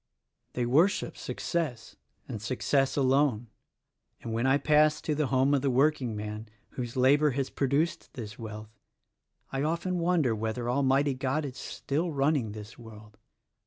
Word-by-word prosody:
They 125 - -1
worship 160 +12 +2
success, 150 -10 -3 0.3
and 110 - -6
success 135 +4 0
alone; 130 -4 +2 0.7
and 115 - -4
when 115 +3 +1
I 135 +1 +4
pass 150 +1 +3
to 155 - -1
the 150 -1 0
home 135 +2 +2
of 140 - +2
the 140 - +1
workingman, 115 -6 0 0.2
whose 120 -2 -5
labor 145 +4 +4
has 135 -1 -1
produced 140 +6 -1
this 115 -3 -7
wealth, 110 -1 -9 0.7
I 135 - -2
often 170 +4 -1
wonder 165 -8 +2
whether 110 +2 -3
Almighty 135 +2 +2
God 135 +4 -1
is 135 -1 -7
still 160 +5 -3
running 140 -6 +1
this 105 +2 -10
world." 110 -2 -13
135 Hz, 145 wpm, -29 LUFS, 115-150 Hz, 0.7 s, I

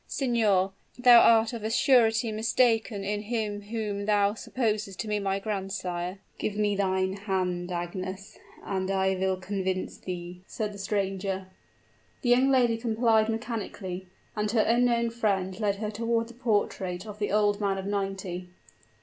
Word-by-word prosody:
Signor, 215 -8 +2 0.3
thou 245 -1 +8
art 225 0 +5
of 230 -3 -5
a 220 - -1
surety 230 -2 +4
mistaken 225 -1 +1
in 205 +1 -2
him 210 -2 -2
whom 205 -1 -4
thou 205 -1 +3
supposes 215 -4 -2
to 215 - -5
be 210 0 0
my 195 -1 0
grandsire?" 190 -3 -3 0.2
"Give 210 - -2
me 205 -1 +1
thine 190 -1 +1
hand, 185 -3 -2
Agnes 185 +3 -5 0.3
and 190 -1 -2
I 190 0 +2
will 190 0 0
convince 185 0 -3
thee," 180 0 -6
said 210 -1 -3
the 200 - -10
stranger. 195 -1 -2 0.7
The 245 - +1
young 255 +2 +5
lady 245 -4 +3
complied 225 -1 +2
mechanically; 210 -5 -4 0.3
and 210 0 -1
her 220 0 +3
unknown 235 0 +2
friend 195 -4 -1
led 205 -2 +1
her 210 +1 -4
toward 230 +1 -1
the - - -11
portrait 205 -5 -1
of 210 -1 -9
the 205 - -1
old 205 0 +2
man 195 -1 +1
of 190 - -5
ninety. 195 -3 -3
205 Hz, 155 wpm, -28 LUFS, 190-225 Hz, 0.7 s, thou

